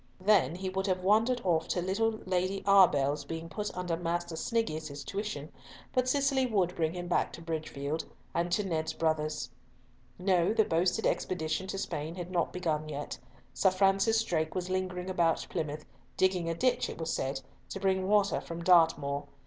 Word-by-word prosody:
Then 190 Hz, -4 st, +3 dB
he 190 Hz, +1 st, -4 dB
would 190 Hz, +1 st, -2 dB
have 185 Hz, -1 st, 0 dB
wandered 225 Hz, +6 st, +3 dB
off 165 Hz, -3 st, +1 dB
to -, -, 0 dB
little 220 Hz, +4 st, 0 dB
Lady 185 Hz, +1 st, -1 dB
Arbell's 150 Hz, -8 st, +5 dB
being 165 Hz, +3 st, -6 dB
put 210 Hz, +6 st, -3 dB
under 180 Hz, -2 st, -1 dB
Master 170 Hz, 0 st, -2 dB
Sniggius's 155 Hz, -, -2 dB
tuition, 195 Hz, -7 st, -4 dB, 0.4 s
but 255 Hz, 0 st, +2 dB
Cicely 275 Hz, -1 st, +2 dB
would 190 Hz, -6 st, +1 dB
bring 160 Hz, 0 st, 0 dB
him 175 Hz, 0 st, -5 dB
back 175 Hz, -, +1 dB
to -, -, -9 dB
Bridgefield, 155 Hz, -2 st, -3 dB, 0.3 s
and 170 Hz, +1 st, 0 dB
to 205 Hz, +4 st, +2 dB
Ned's 160 Hz, -4 st, -2 dB
brothers. 155 Hz, -5 st, -1 dB, 0.7 s
No, 180 Hz, +1 st, +2 dB
the 220 Hz, -, +4 dB
boasted 175 Hz, +6 st, +1 dB
expedition 160 Hz, +1 st, -1 dB
to 195 Hz, -, -4 dB
Spain 160 Hz, -3 st, -4 dB
had 180 Hz, 0 st, -6 dB
not 175 Hz, -2 st, 0 dB
begun 155 Hz, -4 st, -2 dB
yet. 145 Hz, -3 st, -5 dB, 0.3 s
Sir 190 Hz, -, +4 dB
Francis 195 Hz, +4 st, +3 dB
Drake 160 Hz, -5 st, -1 dB
was 185 Hz, 0 st, -2 dB
lingering 185 Hz, -1 st, -2 dB
about 170 Hz, -3 st, +1 dB
Plymouth, 155 Hz, -3 st, -3 dB, 0.3 s
digging 185 Hz, -3 st, +2 dB
a 165 Hz, -, -1 dB
ditch, 250 Hz, +8 st, +1 dB
it -, -, -7 dB
was 160 Hz, 0 st, -2 dB
said, 135 Hz, 0 st, -2 dB, 0.3 s
to 195 Hz, -, -5 dB
bring 190 Hz, -1 st, +1 dB
water 205 Hz, -1 st, +3 dB
from 170 Hz, 0 st, -7 dB
Dartmoor. 150 Hz, -5 st, +3 dB
180 Hz, 175 wpm, -30 LUFS, 160-195 Hz, 0.7 s, Arbell's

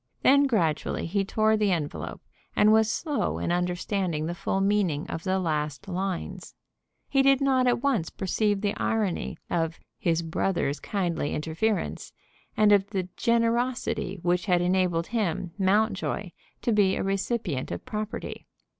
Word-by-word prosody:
Then 280 Hz, +1 st, +6 dB
gradually 170 Hz, -, 0 dB
he 195 Hz, +4 st, 0 dB
tore 215 Hz, +2 st, +2 dB
the 210 Hz, -2 st, +2 dB
envelope, 155 Hz, -5 st, -3 dB, 0.3 s
and 215 Hz, +1 st, +5 dB
was 220 Hz, 0 st, +4 dB
slow 295 Hz, 0 st, -1 dB
in -, -, -1 dB
understanding 180 Hz, -2 st, -1 dB
the 170 Hz, -, -2 dB
full 195 Hz, +1 st, -1 dB
meaning 195 Hz, -7 st, +1 dB
of 165 Hz, -, -5 dB
the 190 Hz, 0 st, +1 dB
last 155 Hz, -2 st, -2 dB
lines. 190 Hz, 0 st, -4 dB, 0.5 s
He 275 Hz, -, +3 dB
did 275 Hz, -1 st, +5 dB
not 265 Hz, -2 st, +3 dB
at 245 Hz, 0 st, +1 dB
once 230 Hz, -13 st, +1 dB
perceive 205 Hz, +1 st, 0 dB
the 205 Hz, -1 st, 0 dB
irony 210 Hz, -5 st, -1 dB
of 165 Hz, -1 st, -1 dB, 0.2 s
"his 170 Hz, -1 st, +1 dB
brother's 165 Hz, -3 st, -1 dB
kindly 175 Hz, -7 st, -2 dB
interference," 165 Hz, +8 st, -2 dB, 0.4 s
and 215 Hz, -1 st, +5 dB
of 200 Hz, -1 st, +4 dB
the 185 Hz, -3 st, -3 dB
"generosity" 235 Hz, -3 st, 0 dB
which 175 Hz, +2 st, +1 dB
had 180 Hz, -2 st, +4 dB
enabled 175 Hz, -2 st, +1 dB
him, 185 Hz, -6 st, -2 dB
Mountjoy, 200 Hz, -1 st, +1 dB, 0.3 s
to 235 Hz, -, +1 dB
be 205 Hz, -3 st, +3 dB
a -, -, -2 dB
recipient 195 Hz, -, -1 dB
of 85 Hz, -, -5 dB
property. 215 Hz, +1 st, -5 dB
195 Hz, 145 wpm, -27 LUFS, 175-220 Hz, 0.5 s, Then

